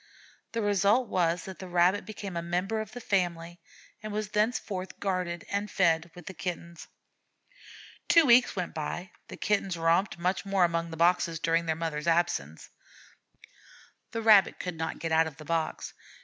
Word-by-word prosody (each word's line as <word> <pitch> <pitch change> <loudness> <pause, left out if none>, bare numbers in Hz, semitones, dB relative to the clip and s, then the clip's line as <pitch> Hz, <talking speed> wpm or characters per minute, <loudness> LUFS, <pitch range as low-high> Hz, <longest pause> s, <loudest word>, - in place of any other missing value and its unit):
The 230 -1 -1
result 205 +4 +2
was 170 -1 0
that 190 -1 -9
the 185 - -7
Rabbit 180 +3 +2
became 200 -3 -7
a 170 - -1
member 180 +6 -1
of 215 -1 -9
the 245 - -6
family, 175 -5 -2 0.4
and 215 -1 -6
was 210 0 -3
thenceforth 210 -3 -2
guarded 180 -3 -2
and 200 +1 -1
fed 170 -3 +2
with 175 - -12
the 190 - -7
Kittens. 170 -2 -6 1.2
Two 330 -2 +6
weeks 245 -1 +5
went 180 -3 -3
by. 175 +4 -5 0.2
The - - -9
Kittens 195 -4 0
romped 165 +4 +1
much 180 +2 -1
among 175 -4 +1
the 160 - -8
boxes 170 -1 +2
during 165 0 +1
their 160 - +1
mother's 160 -1 -4
absence. 165 - 0 1.4
The 225 +2 -4
Rabbit 210 -4 +6
could 180 -2 -4
not 160 0 -4
get 165 +1 -4
out 160 0 +4
of 155 - -9
the 155 - -11
box. 165 0 -2
180 Hz, 165 wpm, -28 LUFS, 165-200 Hz, 1.4 s, Two